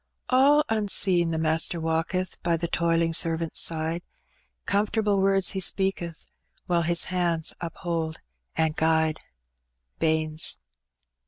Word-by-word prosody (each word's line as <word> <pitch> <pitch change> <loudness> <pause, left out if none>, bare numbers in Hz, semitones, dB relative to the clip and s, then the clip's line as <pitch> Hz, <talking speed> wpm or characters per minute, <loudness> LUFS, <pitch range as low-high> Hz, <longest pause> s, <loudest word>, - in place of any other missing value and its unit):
All 280 +4 +5
ni^seen 195 -5 +2
the 160 - -2
MastjBr 160 +2 +1
walketh 165 +3 -2
By. 170 -1 0
the 170 +1 -3
toiling 165 0 0
servant's 165 0 +1
side; 165 +1 0 0.6
Comfortable 205 0 0
words 195 -1 +3
He 190 - -3
speaketh, 190 -3 -1 0.4
Whije 170 -2 +1
His 170 0 +3
hands. 170 -3 0
uphold 165 -1 -4 0.4
and. 160 -1 +1
guide. 160 0 +1 0.8
Baynes. 155 - +1
170 Hz, 110 wpm, -25 LUFS, 160-190 Hz, 0.8 s, All